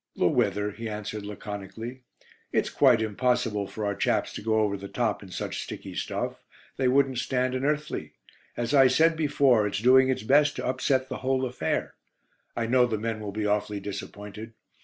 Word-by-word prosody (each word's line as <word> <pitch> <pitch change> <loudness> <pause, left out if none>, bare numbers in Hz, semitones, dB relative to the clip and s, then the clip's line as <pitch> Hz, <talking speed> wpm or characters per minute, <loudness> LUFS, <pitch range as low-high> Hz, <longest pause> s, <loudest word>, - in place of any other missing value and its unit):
"The - - +1
weather," 105 0 +1
he 115 +2 -6
answered 105 0 -5
laconically. 105 +4 -7 0.5
"It's - - 0
quite 125 -5 +4
impossible 110 -2 0
for 110 +1 -5
our 100 - 0
chaps 100 - 0
to - - -6
go 110 0 +2
over 105 -2 +1
the 100 0 -7
top - - -1
in - - -11
such - - -4
sticky - - -7
stuff. - - -3 0.3
They 130 - +2
wouldn't 130 -1 +3
stand 130 0 0
an 130 0 -2
earthly. 150 +1 -2 0.4
As 120 +3 -2
I 135 -2 +7
said 160 +6 +4
before, 140 -8 +3
it's 100 - -2
doing 130 +4 +5
its 130 - -1
best 145 +5 +4
to - - -4
upset 130 +1 +1
the 130 - -5
whole 130 0 0
affair. 120 -11 -2 0.6
I 115 - -1
know 125 +1 +4
the 110 -2 -1
men 110 0 -3
will 105 -2 -5
be 105 +1 -3
awfully 105 0 0
disappointed. 105 +2 -7
115 Hz, 185 wpm, -27 LUFS, 105-130 Hz, 0.6 s, I